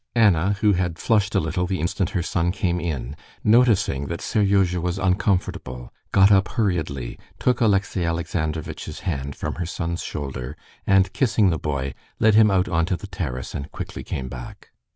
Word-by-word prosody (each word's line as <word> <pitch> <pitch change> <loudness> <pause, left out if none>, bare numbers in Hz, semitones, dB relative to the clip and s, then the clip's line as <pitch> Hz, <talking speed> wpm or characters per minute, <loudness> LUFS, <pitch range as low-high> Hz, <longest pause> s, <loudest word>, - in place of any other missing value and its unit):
Anna, 100 -4 +4
who 105 -2 +5
had 90 -2 -1
flushed 105 +2 +1
a - - +5
little 90 +3 -1
the 95 0 -2
instant 85 +3 -1
her 85 - -1
son 85 +1 0
came 90 -2 -1
in, 75 -6 -3 0.3
noticing 105 - +3
that 85 - -4
Seryozha 95 -4 +2
was 90 +2 -1
uncomfortable, 90 - -1 0.2
got 95 +1 +6
up 95 -1 +5
hurriedly, 80 - -2 0.2
took 125 -1 +1
Alexey 100 -4 +2
Alexandrovitch's 80 -2 -3
hand 70 -6 -3
from - - -3
her - - -1
son's 85 0 -3
shoulder, 70 -1 -5 0.3
and 95 -1 +4
kissing 115 -6 +3
the 80 - -1
boy, 70 -3 -2 0.3
led 110 -1 +5
him 110 0 +6
out 95 -2 +2
onto 85 +2 +1
the - - -9
terrace, 65 - -5
and 70 +1 -5
quickly - - -6
came 65 -1 -4
back. - - -9
90 Hz, 170 wpm, -23 LUFS, 75-100 Hz, 0.3 s, got